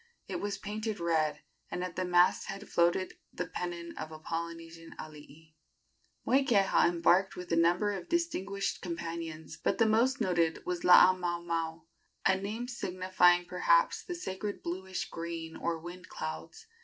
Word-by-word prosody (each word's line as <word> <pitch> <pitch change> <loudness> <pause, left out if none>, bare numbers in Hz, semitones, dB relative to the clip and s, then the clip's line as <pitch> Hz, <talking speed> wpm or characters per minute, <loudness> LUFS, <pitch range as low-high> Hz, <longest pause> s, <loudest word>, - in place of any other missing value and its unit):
It - - -4
was 205 0 -2
painted 215 +1 -4
red, 160 -3 +1 0.3
and 180 - -3
at 180 -1 -5
the 185 - -1
masthead 180 +3 +2
floated 175 +2 +1
the - - -3
pennon 170 -1 -5
of 155 0 -5
a 155 - -8
Polynesian 165 +1 -6
alii. 155 +1 -12 0.7
Moikeha 235 -10 +4
embarked 175 +3 +3
with 180 -1 -8
a - - +3
number 175 +5 +3
of 190 -3 -6
distinguished 200 - -1
companions, 165 -2 -5
but - - 0
the 225 - +4
most 235 +5 +3
noted 170 -3 +1
was 180 -1 -2
Laamaomao 170 -3 +4 0.4
a 190 - +5
name 210 +5 -4
signifying, 185 -5 +2
perhaps, - - +2
the 355 - -5
sacred 205 - -5
bluish 185 +2 -4
green 165 -1 -6
or 170 -1 -2
wind 175 +3 -10
clouds. 445 0 -6
180 Hz, 145 wpm, -31 LUFS, 165-200 Hz, 0.7 s, a